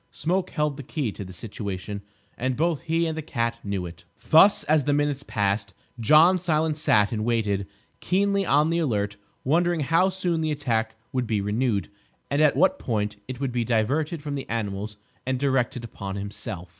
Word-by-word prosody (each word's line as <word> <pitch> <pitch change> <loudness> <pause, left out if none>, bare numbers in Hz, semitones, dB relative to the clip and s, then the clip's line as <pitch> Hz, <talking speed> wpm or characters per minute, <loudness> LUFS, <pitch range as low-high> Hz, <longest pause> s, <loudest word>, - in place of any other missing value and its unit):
Smoke 180 +3 -1
held 150 -3 -1
the - - -5
key 135 -3 -3
to 100 - -7
the 95 - -9
situation; 100 0 -6 0.3
and 130 0 -2
both 165 -1 +1
he 165 0 0
and 160 -1 -2
the 160 - -3
cat 115 -5 -2
knew 100 -3 -2
it. 85 -1 -10 0.3
Thus, 195 +6 +7
as 150 -2 +2
the 145 - +2
minutes 145 -1 0
passed, 100 -4 -1 0.2
John 155 +9 +6
Silence 160 -2 0
sat 105 -8 +3
and 110 -2 -2
waited, 105 -4 0 0.3
keenly 200 +1 +1
on 150 -2 +3
the 170 - +1
alert, 105 -9 -1 0.3
wondering 170 +3 +2
how 165 +6 +3
soon 180 -3 -1
the 155 - 0
attack 115 -7 -1 0.2
would 125 -2 0
be 110 -2 0
renewed, 105 0 0 0.4
and 140 +2 +2
at 150 -2 +5
what 190 - +3
point 105 -3 -2
it 130 -1 -6
would 135 -2 -1
be 120 -1 0
diverted 140 +8 0
from 145 -2 -4
the 140 -1 -5
animals 105 -2 -3 0.3
and 130 0 -1
directed 130 -3 0
upon 100 -4 -6
himself. 100 -2 -6
130 Hz, 185 wpm, -25 LUFS, 105-155 Hz, 0.4 s, Thus